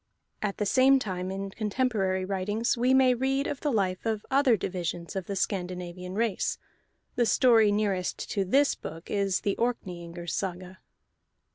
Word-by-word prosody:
At 205 -2 -2
the 210 - -1
same 260 +6 +5
time, 185 -7 -3
in 195 +1 -4
contemporary 210 -4 0
writings, 205 +4 -1
we 250 +2 +2
may 260 -1 +5
read 270 +3 0
of 285 - -4
the 295 - 0
life 190 -5 0
of 220 -2 -2
other 265 -4 +4
divisions 175 -1 -4
of 190 -3 -3
the 200 - -3
Scandinavian 180 -1 -3
race; 225 -2 0 0.6
the 240 -2 +2
story 225 -2 +5
nearest 200 -3 0
to 200 - +1
this 275 +10 +3
book 165 +2 -9
is 200 -2 +1
the 200 - 0
Orkneyingers' 175 -8 -3
Saga. 185 0 -4
200 Hz, 155 wpm, -28 LUFS, 185-235 Hz, 0.6 s, same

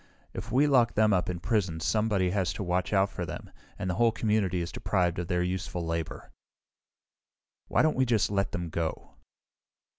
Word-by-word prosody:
If 110 +5 -6
we 135 +5 +4
lock 125 -5 +3
them 110 -1 +4
up 90 -1 +1
in 90 -1 -3
prison 90 -4 0
somebody 105 0 +1
has 90 -4 0
to 85 - -4
watch 90 -2 -1
out 100 0 +3
for - - -4
them, - - -7 0.3
and 100 - -4
the 90 - 0
whole 115 +5 +3
community 105 -5 0
is 85 0 -3
deprived 90 -3 0
of 90 - -3
their 90 0 +1
useful 90 -1 -3
labor. 80 -1 -4 1.4
"Why - - +2
don't 155 - +2
we 130 0 +2
just 110 -4 +2
let 100 -1 0
them 85 -1 -4
go?" 80 0 -3
95 Hz, 185 wpm, -28 LUFS, 90-110 Hz, 1.4 s, we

